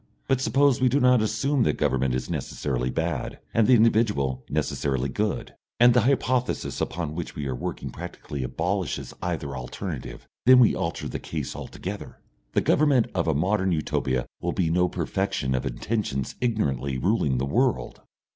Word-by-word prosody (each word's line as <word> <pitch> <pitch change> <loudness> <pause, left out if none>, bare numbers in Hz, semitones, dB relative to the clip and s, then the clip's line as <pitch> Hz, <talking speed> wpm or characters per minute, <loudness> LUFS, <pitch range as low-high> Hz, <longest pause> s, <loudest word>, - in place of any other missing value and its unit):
But 135 -1 +2
suppose 135 -1 +3
we 130 - +5
do 140 +4 +2
not 125 -3 +5
assume 115 +6 +1
that - - +2
government 65 -3 +1
is 65 0 -3
necessarily 65 -3 -2
bad, 80 -1 -2 0.2
and 110 -2 +4
the 130 - +7
individual 105 - +2
necessarily 70 -1 -1
good 105 +8 -2 0.3
and 120 0 +7
the 125 - +5
hypothesis 125 0 0
upon 80 -1 -2
which 85 0 -5
we 75 - -4
are 65 - -2
working - - -5
practically 80 -4 -7
abolishes 90 +8 -2
either 80 -6 -3
alternative 60 -1 -6 0.2
then 130 0 +9
we 125 -3 +6
alter - - -3
the - - -4
case - - -5
altogether. 100 +2 -7 0.4
The - - +3
government 145 -6 +3
of 85 -2 0
a 80 - +2
modern 95 +4 +1
Utopia 65 -5 -1 0.2
will - - -1
be 85 -4 +1
no 90 +1 +3
perfection 95 -11 -1
of 65 - -1
intentions 70 - -2
ignorantly 70 - 0
ruling 75 - +1
the 65 - 0
world.... 65 -2 0
90 Hz, 165 wpm, -25 LUFS, -, 0.4 s, then